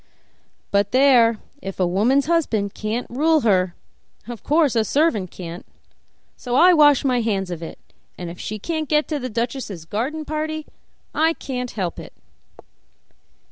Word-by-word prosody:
But 200 Hz, +1 st, +1 dB
there, 250 Hz, -4 st, +5 dB, 0.2 s
if 195 Hz, -4 st, -7 dB
a 185 Hz, -, +3 dB
woman's 225 Hz, +10 st, +2 dB
husband 235 Hz, -, 0 dB
can't 220 Hz, +3 st, -3 dB
rule 310 Hz, +5 st, +2 dB
her 185 Hz, -6 st, +2 dB, 0.5 s
of 240 Hz, -2 st, -7 dB
course 300 Hz, -4 st, +2 dB
a 225 Hz, -, +3 dB
servant 220 Hz, -, +1 dB
can't; 175 Hz, +1 st, -8 dB, 0.7 s
so 245 Hz, -1 st, -4 dB
I 360 Hz, +6 st, +7 dB
wash 290 Hz, -4 st, +5 dB
my 250 Hz, -2 st, +2 dB
hands 195 Hz, -5 st, -1 dB
of 170 Hz, -2 st, -5 dB
it, 165 Hz, -, -8 dB, 0.4 s
and 175 Hz, -, -6 dB
if 170 Hz, +1 st, -8 dB
she 215 Hz, -, -5 dB
can't 315 Hz, -, -3 dB
get 300 Hz, 0 st, +2 dB
to 300 Hz, -2 st, -1 dB
the 255 Hz, -1 st, -4 dB
duchess' 230 Hz, -, -4 dB
garden 270 Hz, -, -3 dB
party 310 Hz, 0 st, -3 dB, 0.5 s
I 320 Hz, +1 st, +2 dB
can't 250 Hz, -5 st, -5 dB
help 185 Hz, -7 st, -4 dB
it." -, -, -11 dB
245 Hz, 155 wpm, -22 LUFS, 200-300 Hz, 0.7 s, I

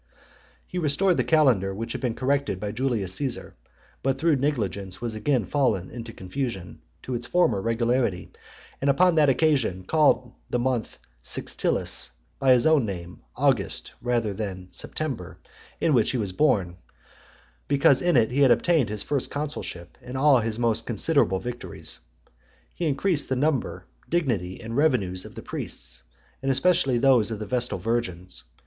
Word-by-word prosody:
He 180 Hz, -, -4 dB
restored 170 Hz, +4 st, +2 dB
the -, -, +2 dB
calendar, 120 Hz, -, +3 dB
which 115 Hz, +3 st, -5 dB
had 130 Hz, -, -4 dB
been 120 Hz, -3 st, -1 dB
corrected 140 Hz, -6 st, 0 dB
by 105 Hz, 0 st, -3 dB
Julius 110 Hz, -6 st, -1 dB
Caesar, 130 Hz, +2 st, -2 dB, 0.5 s
but 135 Hz, 0 st, 0 dB
through 155 Hz, 0 st, +2 dB
negligence 100 Hz, -9 st, -2 dB
was 120 Hz, -2 st, -3 dB
again 115 Hz, +1 st, 0 dB
fallen 115 Hz, -10 st, 0 dB
into 115 Hz, -1 st, -7 dB
confusion, 95 Hz, -2 st, -5 dB, 0.2 s
to 130 Hz, -, -4 dB
its 120 Hz, 0 st, -3 dB
former 175 Hz, -, +2 dB
regularity; 115 Hz, -3 st, 0 dB, 0.5 s
and 140 Hz, -, +2 dB
upon 180 Hz, +6 st, +4 dB
that 155 Hz, -3 st, +4 dB
occasion, 130 Hz, -, +2 dB
called 135 Hz, -1 st, +2 dB, 0.2 s
the -, -, 0 dB
month 125 Hz, -2 st, -1 dB, 0.2 s
Sextilis, -, -, -1 dB, 0.3 s
by 135 Hz, -1 st, +4 dB
his 120 Hz, -2 st, +3 dB
own 155 Hz, -4 st, +5 dB
name, 90 Hz, -4 st, -6 dB
August, -, -, 0 dB
rather 120 Hz, -4 st, 0 dB
than 95 Hz, -3 st, -5 dB
September, 130 Hz, -, -5 dB, 0.4 s
in 160 Hz, -, +2 dB
which 120 Hz, -4 st, +3 dB
he 130 Hz, -, 0 dB
was 100 Hz, -5 st, -2 dB
born; 95 Hz, -, +1 dB, 0.9 s
because 140 Hz, -1 st, +4 dB
in 175 Hz, -5 st, +3 dB
it 115 Hz, -1 st, +3 dB
he 135 Hz, -, -1 dB
had 135 Hz, -, +6 dB
obtained 140 Hz, 0 st, +3 dB
his 105 Hz, -1 st, -1 dB
first 140 Hz, -3 st, -2 dB
consulship, 145 Hz, -, -5 dB
and 125 Hz, +1 st, -6 dB
all 135 Hz, -1 st, +5 dB
his 110 Hz, -1 st, -2 dB
most 115 Hz, -1 st, 0 dB
considerable 120 Hz, -, +2 dB
victories. 90 Hz, -10 st, -5 dB, 0.7 s
He 170 Hz, -, -2 dB
increased 150 Hz, +2 st, +1 dB
the 130 Hz, -, +1 dB
number, 140 Hz, 0 st, -1 dB, 0.2 s
dignity, 115 Hz, -, -1 dB
and 115 Hz, 0 st, -6 dB
revenues 110 Hz, -11 st, +1 dB
of -, -, -12 dB
the -, -, -8 dB
priests, -, -, -5 dB, 0.4 s
and 135 Hz, -, -1 dB
especially 135 Hz, -2 st, +3 dB
those 120 Hz, -4 st, +4 dB
of 110 Hz, -, -3 dB
the 105 Hz, -, -5 dB
Vestal 125 Hz, -1 st, -1 dB
Virgins. 90 Hz, -, -3 dB
120 Hz, 160 wpm, -25 LUFS, 100-140 Hz, 0.9 s, had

